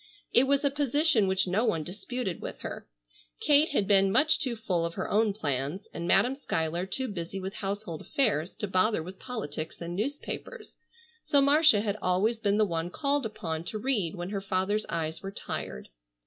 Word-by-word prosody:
It 250 - +6
was 280 +1 +2
a 280 - +3
position 285 -5 +2
which 190 0 +2
no 190 +5 +1
one 165 -9 +1
disputed 200 +2 -4
with - - -7
her. - - -6 0.5
Kate 295 +2 +5
had 210 -9 +1
been 195 -1 +4
much 305 +8 +4
too 255 -5 -1
full 190 -6 -1
of 170 0 -3
her - - -2
own 215 +1 +3
plans 145 -1 -3
and 170 0 -4
Madam 250 +7 +4
Schuyler 170 - -2
too 260 +7 -1
busy 190 -2 -5
with 190 +1 -5
household 195 -5 -4
affairs 205 - 0
to 210 - -3
bother 190 -1 +2
with 185 +3 -10
politics 160 - -5
and 170 0 -5
newspapers, 290 - -5 0.4
so 285 - +3
Marcia 285 -4 +6
had 210 -1 -2
always 200 +6 +1
been 205 -2 +1
the 215 - +4
one 165 -2 -2
called 280 +4 0
upon 160 -6 -4
to 215 - -2
read 215 -8 0
when 175 +2 -5
her 200 -2 -2
father's 195 +2 0
eyes 160 -1 -3
were 195 - -5
tired. 65 - -6
200 Hz, 190 wpm, -29 LUFS, 175-250 Hz, 0.5 s, It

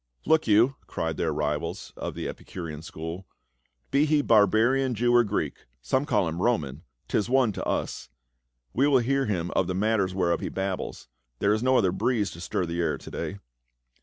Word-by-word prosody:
"* - - -53
" - - -32
Look 160 -3 +3
you," 115 +6 +4
cried 80 -1 -3
their 80 - 0
rivals 75 0 -3
of - - -5
the - - -4
Epicurean 80 -4 -7
school, 80 +3 -7 0.6
"be 145 +2 +3
he 150 -1 +3
barbarian 115 +5 +4
Jew 120 +2 +2
or 120 0 +6
Greek 100 - -3
— - - -47
some 140 +3 +3
call 110 - +2
him 80 +2 -3
Roman 80 - 0
— - - -47
'tis 105 - 0
one 130 -3 +3
to - - -5
us. - - -2 0.6
We 135 +4 +3
will 140 -2 +5
hear 135 +2 +1
him 90 -4 -1
of 95 - +1
the 90 - -2
matters 100 -2 +1
whereof 85 -3 +1
he - - -3
babbles; 95 -7 -4 0.3
there 100 +10 +2
is 110 - 0
no 130 +1 +3
other 95 -4 +3
breeze 105 +2 0
to 85 - -10
stir 90 - -1
the 85 0 -4
air 75 -4 0
to - - -11
day." 100 - -4
100 Hz, 205 wpm, -27 LUFS, 85-120 Hz, 0.6 s, or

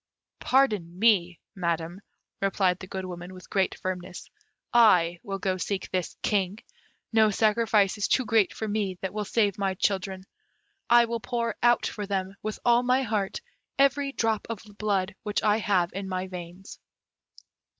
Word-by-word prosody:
"Pardon 210 -11 +1
me, 185 -5 +3
Madam," 170 -1 -2 0.4
replied 190 -2 +1
the 190 - -9
Good 190 0 -5
Woman, 180 0 -8
with 185 - -14
great 190 -1 +1
firmness; 185 -1 -6 0.4
"I 180 -8 +5
will 195 -1 -4
go 190 -1 -1
seek 195 +1 -3
this 180 -3 -2
King; 200 -1 0 0.6
no 220 -1 +5
sacrifice 215 -1 +2
is 205 - +1
too 260 - +2
great 220 -3 +3
for 220 - -5
me 205 -3 -2
that 190 - -4
will 210 0 -3
save 205 -2 +1
my 195 -1 0
children. 190 0 -1 0.7
I 240 0 +7
will 235 0 -3
pour 235 -2 -2
out 240 0 +4
for 205 -2 -4
them, 190 -1 -2
with 215 0 -4
all 240 0 +5
my 255 +2 +2
heart, 205 -4 -2 0.4
every 275 0 +3
drop 225 -5 -1
of 230 -2 -5 0.2
blood 195 -2 0
which 210 -1 -2
I 210 0 +3
have 185 -5 +1
in 195 0 -5
my 185 0 -2
veins." 180 0 -9
200 Hz, 160 wpm, -27 LUFS, 185-220 Hz, 0.7 s, I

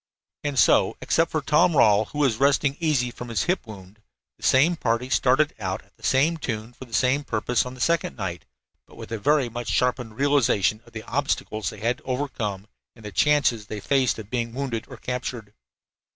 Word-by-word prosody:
And 145 -2 -2
so, - - +4
except 165 +1 +1
for 155 - -1
Tom 155 +3 +3
Rawle, 110 -5 +5
who 145 - -10
was 135 -7 +2
resting 140 0 +3
easy 145 -7 +1
from 120 - -8
his 115 - 0
hip 180 -8 -1
wound, 100 0 -12 0.4
the - - -19
same 150 +7 +4
party 125 -3 -1
started 135 +5 +3
out 95 -2 -3
at 100 - -32
the - - -27
same 150 +6 +2
tune 115 -5 -5
for 130 - -11
the 120 - -21
same 135 +3 +2
purpose 120 0 0
on 125 - -8
this 125 - -2
second 170 -1 0
night, 90 -5 -4 0.4
but - - -17
with - - -10
a 115 - -3
very 145 +3 +2
much 120 +1 -5
sharpened 125 -3 0
realization 120 -8 +2
of 120 - -18
the 110 -1 -7
obstacles 120 -5 -2
they 105 - -11
had 120 +5 0
to - - -25
overcome 120 -7 -3 0.3
and 115 -2 -15
the 105 - -6
chances 125 -3 +2
they 105 - -5
faced 130 +4 +1
of 110 -2 -10
being 115 -2 -2
wounded 130 -5 -3
or - - -10
captured. 120 -4 -5
125 Hz, 205 wpm, -24 LUFS, 110-140 Hz, 0.4 s, Rawle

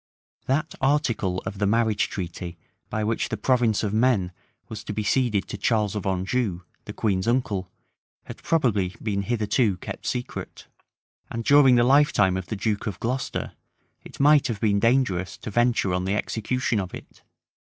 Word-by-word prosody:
That 150 +4 0
article 115 -10 +1
of 95 0 -5
the 100 - +2
marriage 110 -1 +1
treaty 85 -1 -6 0.3
by 110 - -2
which 110 +2 -1
the - - -3
province 120 -5 +2
of 105 -1 -1
Maine 110 -6 +2 0.4
was 110 -1 -7
to 105 - -4
be 105 - -2
ceded 110 -2 +1
to 105 - -6
Charles 105 -2 +1
of 100 -2 -3
Anjou, 95 0 -1 0.2
the - - -6
queen's 100 -2 -1
unele, 110 -6 0 0.6
had - - -10
probably 105 - +1
been 100 -3 -1
hitherto 110 -1 +1
kept - - -7
secret; 125 0 -5 0.6
and 115 - -4
during 140 -3 +6
the 120 - +4
lifetime 130 -8 +4
of 95 -1 -4
the 110 - -3
duke 105 +2 -2
of 100 -4 -4
Glocester, 125 +3 -3 0.5
it - - -13
might 145 0 +5
have 115 -4 -3
been 100 -2 +2
dangerous 100 -8 +1
to - - -7
venture 120 -4 +2
on 90 0 -1
the 95 +2 0
execution 115 +3 -1
of 95 -2 -5
it. - - -13
110 Hz, 170 wpm, -25 LUFS, 95-125 Hz, 0.6 s, during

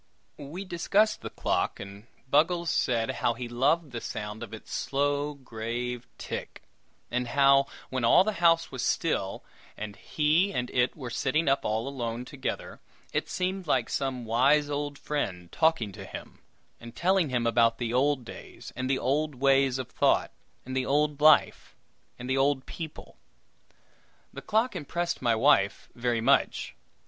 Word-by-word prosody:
We 160 +8 -7
discussed 200 +5 +1
the - - -5
clock, - - -1
and 100 +3 -10 0.2
Buggles 165 +5 +2
said 115 -2 +1
how 120 - 0
he 120 +1 -5
loved 140 +6 +1
the 120 -1 -5
sound 105 +1 -5
of 115 -3 -7
its 110 - -9
slow, 145 +1 -1
grave 120 -1 -5
tick; - - -6 0.5
and 125 0 -1
how, 140 +1 +4 0.2
when 130 -2 -2
all 115 +10 +6
the 215 - 0
house 165 -1 +4
was 130 -2 -4
still, 100 -12 -1 0.3
and 105 -1 -6
he 160 +6 +1
and 125 0 -2
it 125 +3 +1
were 125 -5 -6
sitting 155 +7 0
up 135 +1 +2
alone 115 +1 -2
together, 135 0 -5 0.3
it - - -1
seemed 185 -1 -2
like - - +1
some 130 -3 -2
wise 140 +6 +3
old 145 0 -3
friend 90 -13 -3
talking 160 -10 +2
to - - -9
him, - - -10 0.4
and 115 0 -11
telling 185 -3 +2
him 125 -2 0
about 115 -1 +3
the 120 -1 -3
old 135 0 +2
days - - -10
and 130 +1 -3
the 135 - +2
old 145 +3 0
ways 135 0 +3
of 130 -2 -5
thought, - - +2 0.3
and 130 +1 -5
the 130 - +1
old 145 +2 +1
life 155 +1 +4 0.4
and 125 - -7
the 130 +1 0
old 135 -1 +2
people. 160 -3 -8 1.2
The - - -7
clock 220 +4 +1
impressed 170 +3 -3
my 120 -3 +2
wife 110 -5 +3
very 120 -1 -1
much. 135 +4 +2
135 Hz, 160 wpm, -28 LUFS, 120-150 Hz, 1.2 s, all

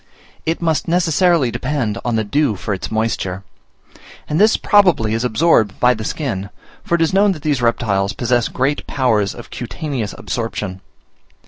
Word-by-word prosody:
It 165 +1 -1
must 160 -2 0
necessarily 170 -5 +2
depend 125 -7 -2
on 120 -2 -1
the 110 - +1
dew 140 +2 +1
for 100 +2 -3
its 95 - -5
moisture; 110 -4 -2 0.8
and 155 +5 0
this 220 +1 +5
probably 180 - +3
is 115 +2 -1
absorbed 120 - +2
by 125 0 +5
the 110 -2 -6
skin, 105 -8 -3 0.3
for 170 - +1
it 165 - +2
is 165 - 0
known, 200 +1 +4
that 155 -5 -11
these 145 -5 0
reptiles 100 -4 +1
possess 120 -1 +1
great 135 +3 -1
powers 110 -7 +1
of - - -11
cutaneous 125 - -4
absorption. 105 -5 -4
125 Hz, 160 wpm, -18 LUFS, 110-160 Hz, 0.8 s, this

